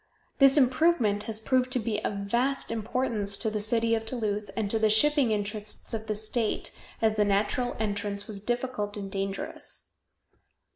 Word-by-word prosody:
This 275 +1 +7
improvement 255 -6 +3
has 220 -1 -2
proved 255 +3 +1
to 255 - +2
be 215 -1 -2
of - - -1
vast 250 +6 0
importance 225 -2 -1
to 220 - 0
the 215 - -1
city 230 +2 +2
of 225 -1 +1
Duluth 215 -3 -2
and 220 -2 0
to 225 - +3
the 220 0 +3
shipping 280 +4 +4
interests 210 +1 -2
of 220 -1 -4
the 215 - -1
state, 215 +1 -1 0.3
as 220 -1 +3
the 210 - +4
natural 205 +5 0
entrance 205 -1 -2
was 205 -2 -8
difficult 240 -3 -2
and 195 -1 -6
dangerous. 195 0 -4
220 Hz, 165 wpm, -28 LUFS, 205-245 Hz, 0.3 s, This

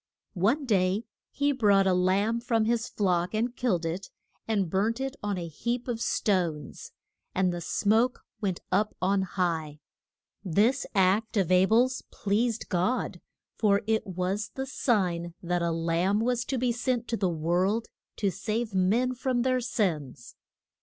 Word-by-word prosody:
One 260 +9 +2
day 200 -1 +1 0.2
he 285 0 +1
brought 205 -7 +4
a 190 - +3
lamb 195 +5 +2
from 230 -2 +1
his 230 0 0
flock, 180 -1 0
and 235 +3 -1
killed 185 -10 0
it, 170 +4 -4 0.4
and 205 -4 +1
burnt 210 +7 0
it 270 +1 -3
on 205 -2 -2
a 170 -1 -4
heap 235 - -3
of 235 -2 -3
stones. 170 -11 -1 0.4
And 185 -1 +2
the 175 - -4
smoke 220 +8 +1 0.2
went 190 -4 -2
up 210 +3 +1
on 195 +1 +2
high. 165 -5 -2 0.6
This 210 - +2
act 200 +4 +2
of 185 -3 +1
A 185 +1 +5
bel's 245 +4 +3
pleased 225 +3 -1
God, 185 +8 -1 0.4
for 200 -2 +3
it 220 -1 0
was 185 +3 -2
the 265 - -3
sign 180 - 0
that 175 0 0
a 170 - +1
Lamb 165 +4 +1
was 240 +1 0
to 265 - -2
be 245 0 +1
sent 245 0 -1
to 235 - 0
the 195 -5 0
world 175 +7 0 0.3
to 200 -3 0
save 220 +2 -3
men 215 +8 +2
from 250 -1 0
their 255 0 +1
sins. 160 - -2
205 Hz, 160 wpm, -28 LUFS, 180-235 Hz, 0.6 s, A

